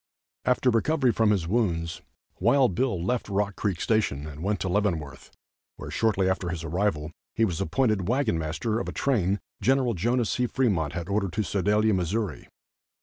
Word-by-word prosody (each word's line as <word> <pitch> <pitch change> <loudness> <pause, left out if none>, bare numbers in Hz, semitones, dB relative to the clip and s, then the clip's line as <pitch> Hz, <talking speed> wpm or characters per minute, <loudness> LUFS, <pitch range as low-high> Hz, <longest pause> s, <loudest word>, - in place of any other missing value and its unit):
After 125 0 +3
recovery 130 +3 +2
from 110 0 +2
his 95 -6 +1
wounds, 85 -6 0 0.4
Wild 120 +2 +4
Bill 95 -5 0
left 120 +1 -1
Rock 100 0 0
Creek 95 -5 -2
Station 105 -11 0
and 75 0 -8
went 100 +2 0
to - - -1
Leavenworth, 85 -9 -1 0.5
where - - -8
shortly 100 -4 +1
after 95 -1 0
his 85 -1 -4
arrival, 85 -2 -1 0.2
he 115 - +3
was 90 -3 -2
appointed 105 -1 +1
wagon 120 -7 +1
master 85 +9 -2
of - - -3
a - - -6
train 100 -7 +1 0.2
Gen. 135 +1 +4
Jno. 120 -1 +1
C. 125 +3 0
Fremont 95 - 0
had 85 +1 -4
ordered 100 -2 -1
to 110 - 0
Sedalia, 105 +4 +2
Missouri. 95 0 -2
100 Hz, 170 wpm, -26 LUFS, 85-115 Hz, 0.5 s, Wild